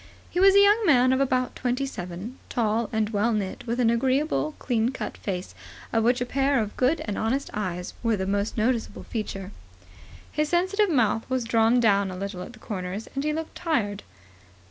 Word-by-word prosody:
He 355 - -1
was 390 +1 +7
a - - +8
young 415 +3 +5
man 255 -8 +5
of 260 - +1
about 255 -2 0
twenty 255 +2 -1
seven, 190 0 -7
tall 225 -1 0
and 220 -1 0
well 215 +2 +1
knit, 205 +2 -3
with 235 +2 -1
an 230 -2 +4
agreeable, 270 +5 +1
clean 230 -2 0
cut 265 - -5
face, 185 -2 -5 0.4
of 225 -1 +2
which 245 +2 +3
a - - +1
pair 275 +1 +1
of 210 -2 -3
good 260 +6 +2
and 205 - -3
honest 260 +6 -1
eyes 180 -4 -3
were 230 -3 +1
the 190 - -2
most 200 +3 -1
noticeable 230 +1 -1
feature. 195 -4 -5 0.8
His 305 0 0
sensitive 375 +4 +2
mouth 235 -6 +1
was 260 -1 0
drawn 230 +1 +3
down 200 -4 +3
a 185 - -6
little 195 -1 -5
at 180 - -8
the - - -14
corners, 190 0 -5
and 275 - -2
he 305 - +1
looked 320 +1 -4
tired. 215 - -1
235 Hz, 195 wpm, -26 LUFS, 210-275 Hz, 0.8 s, a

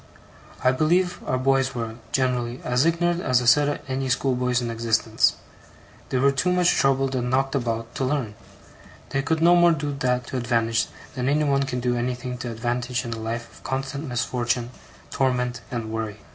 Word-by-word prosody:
I 130 - +5
believe 175 +6 +1
our 130 - +1
boys 135 0 +1
were, 115 -2 -3 0.2
generally, 125 -2 0
as 125 +5 +2
ignorant 175 +1 +1
a 125 - -1
set 125 +4 +5
as 145 - -1
any 130 0 -2
schoolboys 125 -1 +1
in 120 -1 -3
existence; 115 -1 +2 0.7
they 130 - 0
were 140 +2 +4
too 140 +7 +1
much 180 -1 +4
troubled 135 0 +2
and 125 -1 -1
knocked 135 +1 +1
about 115 -3 -2
to 135 - 0
learn; 130 -6 -1 0.8
they 135 - 0
could 160 +3 0
no 175 +1 +7
more 175 -1 +6
do 145 -2 -3
that 125 -1 0
to 130 - -4
advantage, 115 -2 +1 0.3
than 130 -1 -1
any 150 +2 +2
one 140 -1 +1
can 125 -1 -3
do 120 0 +1
anything 125 +1 -3
to 120 - -4
advantage 120 +2 -2
in 115 - -3
a 115 - -6
life 115 +1 -4
of - - -17
constant 135 +3 -3
misfortune, 120 0 -1 0.4
torment, 125 -2 0
and 115 -3 -4
worry. 110 -2 -3
125 Hz, 185 wpm, -24 LUFS, 120-135 Hz, 0.8 s, no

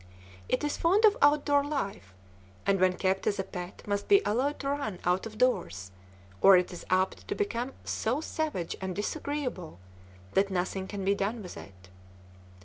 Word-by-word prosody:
It 255 - +1
is 295 - -1
fond 390 +7 +4
of 420 -1 +6
outdoor 290 -1 +4
life, 200 - -4 0.5
and 195 -1 +2
when 185 0 +4
kept 190 0 0
as 205 - +1
a 190 - -1
pet 180 -1 -8
must 205 -1 -2
be 400 - +7
allowed 265 +7 0
to 275 - -2
run 280 -10 -2
out 180 +4 +1
of 215 -1 -11
doors 95 - 0 0.5
or 195 -1 +9
it 180 +1 0
is 175 - -9
apt 185 +1 0
to - - -2
become 270 - -2
so 240 +6 -1
savage 305 - -3
and 190 -1 -3
disagreeable 250 - -3 0.6
that 195 +1 +3
nothing 190 +1 -2
can 200 -1 -5
be 200 - +4
done 205 +3 -2
with 180 - -8
it. 95 -1 -13
200 Hz, 175 wpm, -29 LUFS, 185-285 Hz, 0.6 s, or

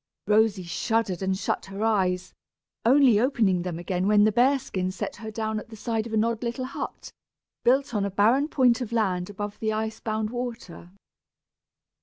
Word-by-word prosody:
Rosy 210 -2 +3
shuddered 190 +2 -1
and 190 0 0
shut - - -2
her 195 +2 -5
eyes, 185 -4 0 0.5
only 255 -3 +5
opening 220 -8 +2
them 175 -2 -4
again 180 +2 -2
when 210 0 +5
the 215 - +4
bear 255 +6 +4
skin 185 -7 -3
set 185 - -5
her 220 -1 -7
down 220 0 -2
at 225 - -12
the 225 - -10
side 225 +1 -2
of 225 - -8
an 215 0 +3
odd 230 -1 -1
little 240 +2 -3
hut, 260 - -6 0.5
built 265 +1 +2
on 205 -2 0
a 200 - -1
barren 225 +9 +3
point 255 -5 +3
of 235 -2 -4
land 190 -6 0
above 205 0 -6
the 220 -1 -1
ice 220 0 -3
bound 215 -1 -2
water. 240 -8 -6
215 Hz, 185 wpm, -26 LUFS, 195-235 Hz, 0.5 s, only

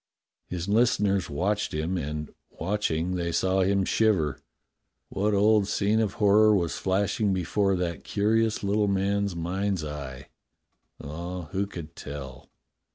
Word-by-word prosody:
His 90 0 -4
listeners 100 -4 +2
watched 100 +6 -1
him, 80 +4 -1
and, 75 -2 -4 0.2
watching, 90 -2 -1
they 85 -2 -1
saw 95 +3 +1
him 95 +1 +2
shiver. 95 -11 +1 0.7
What 100 +2 0
old 105 0 +4
scene 105 +2 +1
of 105 -3 0
horror 105 +1 +5
was 85 -4 0
flashing 100 +1 +1
before 95 +2 +1
that 90 -2 -3
curious 110 +2 +1
little 105 +1 +2
man's 100 0 0
mind's 95 +1 -1
eye.'^ 70 -4 -6 0.8
Ah, 85 +2 -6
who 100 +1 -1
could 85 -4 -9
tell? 70 -1 -8
95 Hz, 130 wpm, -27 LUFS, 85-100 Hz, 0.8 s, horror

